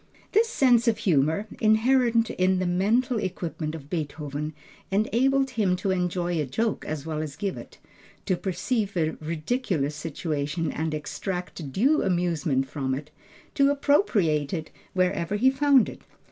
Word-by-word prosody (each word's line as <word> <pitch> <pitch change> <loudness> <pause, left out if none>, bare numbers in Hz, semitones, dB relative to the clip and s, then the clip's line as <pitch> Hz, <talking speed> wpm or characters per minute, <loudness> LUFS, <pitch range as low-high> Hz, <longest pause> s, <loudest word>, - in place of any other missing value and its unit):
This 450 +2 +3
sense 245 - +3
of 225 -2 +3
humor, 165 -2 +2
inherent 230 +1 +3
in 185 0 +2
the 185 - 0
mental 220 +7 +1
equipment 170 -4 -4
of 145 -3 -9
Beethoven, 150 -1 -4 0.4
enabled 260 +7 +2
him 205 -7 +1
to 190 +1 -1
enjoy 175 -2 0
a - - -1
joke 220 - -1
as 155 -2 -4
well 155 -1 -3
as 150 -2 -5
give 200 +1 -3
it, - - -11 0.5
to 185 - +1
perceive 200 +3 -2
a 160 -2 +1
ridiculous 160 - -1
situation 155 0 -3
and 160 0 -2
extract 180 -1 -5
due 270 - +3
amusement 165 -7 0
from 130 -2 -2
it, 145 +3 -8 0.4
to 280 -1 +4
appropriate 205 - +2
it 160 -2 -6 0.2
wherever 185 0 +1
he 255 +6 +4
found 270 -2 +4
it. - - -9
180 Hz, 145 wpm, -26 LUFS, 155-230 Hz, 0.5 s, to